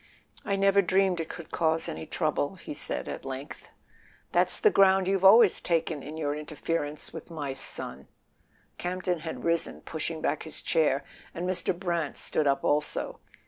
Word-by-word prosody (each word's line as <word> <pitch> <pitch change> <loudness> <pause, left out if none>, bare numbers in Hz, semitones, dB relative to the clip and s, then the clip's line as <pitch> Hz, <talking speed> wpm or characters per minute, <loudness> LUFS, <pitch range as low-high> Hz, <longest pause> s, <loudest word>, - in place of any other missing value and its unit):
"I 200 -3 0
never 195 0 +4
dreamed 190 0 +2
it 165 - -3
could 170 -2 -9
cause 160 -1 +1
any 160 -1 -5
trouble," 155 +1 -1
he 170 - -8
said - - -3
at - - -5
length. 135 +2 -7 0.6
"That's - - +3
the 430 - +5
ground 190 - +5
you've 195 -1 +1
always 205 +1 +7
taken 165 -3 0
in 150 +3 -8
your 145 -2 -1
interference 150 0 -4
with - - -8
my 145 -5 -4
son!" 70 - -5 0.7
Campton 180 -1 -2
had 160 +1 -6
risen, 170 0 0
push¬ 160 0 -4
ing 165 -1 -5
back 155 -1 -1
his 160 - -5
chair, 150 -3 +2 0.3
and 175 +2 -3
Mr. 185 -1 0
Brant 170 -5 -2
stood 150 - 0
up 135 0 +2
also. 150 0 0
165 Hz, 170 wpm, -28 LUFS, 150-185 Hz, 0.7 s, always